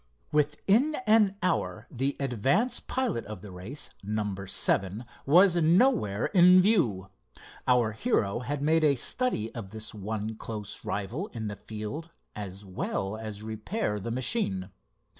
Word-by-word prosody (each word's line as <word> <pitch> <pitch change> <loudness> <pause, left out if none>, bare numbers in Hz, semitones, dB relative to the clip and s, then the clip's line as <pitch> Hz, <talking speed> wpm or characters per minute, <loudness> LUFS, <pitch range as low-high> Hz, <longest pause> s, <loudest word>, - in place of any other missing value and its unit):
Within 195 - +2
an 210 -3 +4
hour 185 - 0
the 135 +1 -1
advance 140 - +1
pilot 255 - -2
of 105 -3 -8
the 100 - -9
race, 95 +11 -7
number 105 -2 -3
seven, 100 +4 0 0.2
was 175 +4 +6
nowhere 170 - +3
in 180 -1 +8
view. 150 - +2 0.6
Our 125 -3 +4
hero 110 - 0
had 140 +3 -3
made 160 +1 +3
a 145 -2 +5
study 130 - -1
of 110 -5 -6
this 110 +1 -6
one 110 +1 -4
close 105 -3 -6
rival 115 - -3
in 110 -3 -4
the 105 - -5
field 110 +12 -6 0.3
as 100 -1 -7
well 95 +1 -3
as 110 -1 -7
repair 110 - -2
the 115 - -5
machine. 115 - -1
115 Hz, 140 wpm, -28 LUFS, 105-175 Hz, 0.6 s, in